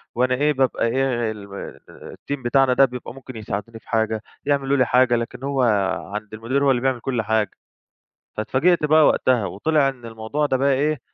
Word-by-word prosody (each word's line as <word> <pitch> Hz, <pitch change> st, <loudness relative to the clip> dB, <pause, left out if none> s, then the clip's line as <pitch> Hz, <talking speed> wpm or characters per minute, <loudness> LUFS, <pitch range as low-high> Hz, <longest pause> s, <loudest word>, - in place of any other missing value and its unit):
وأنا 125 Hz, +1 st, +2 dB
إيه، 150 Hz, +3 st, +2 dB
بابقى 130 Hz, -3 st, +1 dB
إيه 120 Hz, -3 st, 0 dB
ال 105 Hz, -2 st, -9 dB
م 100 Hz, -, -7 dB, 0.4 s
الteam 140 Hz, -2 st, -6 dB
بتاعنا 135 Hz, +1 st, +3 dB
ده 135 Hz, +2 st, +6 dB
بيبقى 125 Hz, -2 st, -7 dB
ممكن 130 Hz, -1 st, -11 dB
يساعدوني 110 Hz, +1 st, -5 dB
في -, -, -25 dB
حاجة، 110 Hz, -1 st, 0 dB, 0.2 s
يعملوا 140 Hz, -1 st, +1 dB
لي 130 Hz, -, +4 dB
حاجة. 125 Hz, 0 st, +3 dB
لكن 120 Hz, +2 st, -4 dB
هو 140 Hz, -1 st, 0 dB, 0.5 s
عند 105 Hz, 0 st, -6 dB
المدير 120 Hz, +6 st, -1 dB
هو 135 Hz, -, +5 dB
اللي 120 Hz, -2 st, +1 dB
بيعمل 130 Hz, -2 st, 0 dB
كل 125 Hz, -1 st, -2 dB
حاجة. 110 Hz, -2 st, 0 dB, 0.9 s
فاتفاجئت 150 Hz, +10 st, +1 dB
بقى 155 Hz, 0 st, +5 dB
وقتها، 125 Hz, -5 st, +2 dB
وطِلع 140 Hz, -, +1 dB
إن 125 Hz, -3 st, -7 dB
الموضوع 115 Hz, +7 st, -2 dB
ده 130 Hz, -, +1 dB
بقى 140 Hz, +2 st, +2 dB
إيه 150 Hz, +1 st, 0 dB
130 Hz, 190 wpm, -22 LUFS, 115-135 Hz, 0.9 s, ده